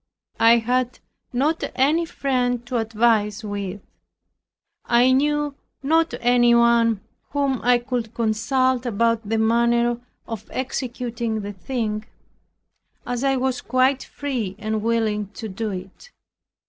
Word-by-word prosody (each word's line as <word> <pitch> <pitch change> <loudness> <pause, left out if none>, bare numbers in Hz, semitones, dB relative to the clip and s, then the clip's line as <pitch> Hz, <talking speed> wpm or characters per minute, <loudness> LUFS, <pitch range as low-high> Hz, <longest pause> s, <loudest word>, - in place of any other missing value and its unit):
I 230 +1 +7
had 250 +2 0 0.3
not 290 +6 0
any 305 +6 +3
friend 245 -5 -1
to 245 0 -2
advise 220 -2 +1
with. 200 -2 -5 1.0
I 245 +2 +4
knew 295 +2 +1 0.3
not 325 +3 +2
anyone 235 -2 +4 0.3
whom 280 -3 0
I 245 +1 +4
could 240 -2 -4
consult 245 +3 +1
about 230 -1 0
the 225 - +1
manner 235 +1 +2 0.3
of 220 -2 -7
executing 240 -3 -3
the 205 0 -6
thing, 215 +2 -3 1.0
as 245 +1 -3
I 270 -1 +2
was 260 0 -1
quite 255 +1 +2
free 245 -9 -4
and 215 0 -2
willing 220 -2 0
to 220 - -6
do 215 +2 -4
it. 190 - -8
235 Hz, 120 wpm, -23 LUFS, 220-255 Hz, 1.0 s, I